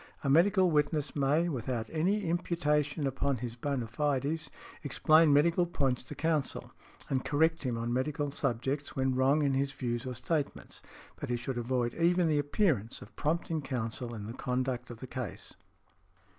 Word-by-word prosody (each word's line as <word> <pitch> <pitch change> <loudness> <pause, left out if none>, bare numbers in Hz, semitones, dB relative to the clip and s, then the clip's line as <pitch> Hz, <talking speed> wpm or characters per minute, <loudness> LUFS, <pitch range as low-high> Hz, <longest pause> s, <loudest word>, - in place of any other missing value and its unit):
"A 140 - +1
medical 185 +3 +5
witness 150 -1 +1
may, 145 +4 +2
without 120 -6 -2
any 190 +7 +1
imputation 150 -4 0
upon 135 0 0
his 120 0 -5
bona 130 0 -2
fides, 145 +5 -1 0.3
explain 155 +2 +4
medical 170 +5 +4
points 135 -7 0
to 130 +3 -9
counsel, 155 -3 -1 0.4
and 130 -2 0
correct 160 +3 +2
him 125 -4 -1
on 115 +1 -2
medical 145 +3 -1
subjects, 140 +1 -2
when 130 -1 +1
wrong 135 +4 +3
in 140 -1 +2
his 135 +1 0
views 120 -1 -3
or 125 - -4
statements, 145 +4 -3 0.4
but - - -6
he 120 - 0
should 120 +1 -3
avoid 120 0 0
even 175 +1 +3
the 150 -2 +2
appearance 145 - 0
of - - -17
prompting 160 +1 -1
counsel 120 -2 -3
in 105 -2 -6
the 115 - -6
conduct 125 -1 -2
of 120 -2 -9
the - - -5
case." 125 -5 -6
140 Hz, 165 wpm, -31 LUFS, 125-155 Hz, 0.4 s, medical